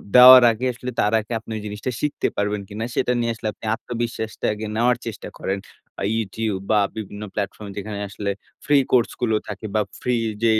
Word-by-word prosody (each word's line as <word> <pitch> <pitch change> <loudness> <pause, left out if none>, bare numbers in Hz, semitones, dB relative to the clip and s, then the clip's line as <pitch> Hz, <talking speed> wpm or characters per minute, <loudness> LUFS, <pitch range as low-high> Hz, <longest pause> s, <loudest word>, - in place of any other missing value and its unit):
দেওয়ার 125 0 +11
আগে 120 +4 -3
আসলে 125 +1 -6
তার 105 +2 +2
আগে 110 +2 -9
আপনি 110 - -11
ঐ - - -4
জিনিসটা 105 +5 -4
শিখতে 150 -1 0
পারবেন 105 0 0
কিনা, 105 +2 -4
সেটা 125 - +1
নিয়ে 115 0 +1
আসলে 110 - -5
আপনি - - -12
আত্মবিশ্বাসটা 115 -2 -4
আগে 110 +1 -5
নেওয়ার 120 +1 +3
চেষ্টা 115 - -6
করেন। 95 +1 -1 0.4
আ - - -1
YouTube 105 -2 -2
বা, 105 -1 +5 0.2
বিভিন্ন 105 0 -6
প্ল্যাটফর্ম 100 0 -4
যেখানে 100 0 -4
আসলে 100 -1 -4 0.4
ফ্রি 145 -1 +5
কোর্সগুলো 120 -2 +2
থাকে। 105 +1 -6
বা, 105 - +4 0.2
ফ্রি 125 -1 +1 0.3
যেই 110 -1 +4
110 Hz, 185 wpm, -23 LUFS, 105-120 Hz, 0.4 s, দেওয়ার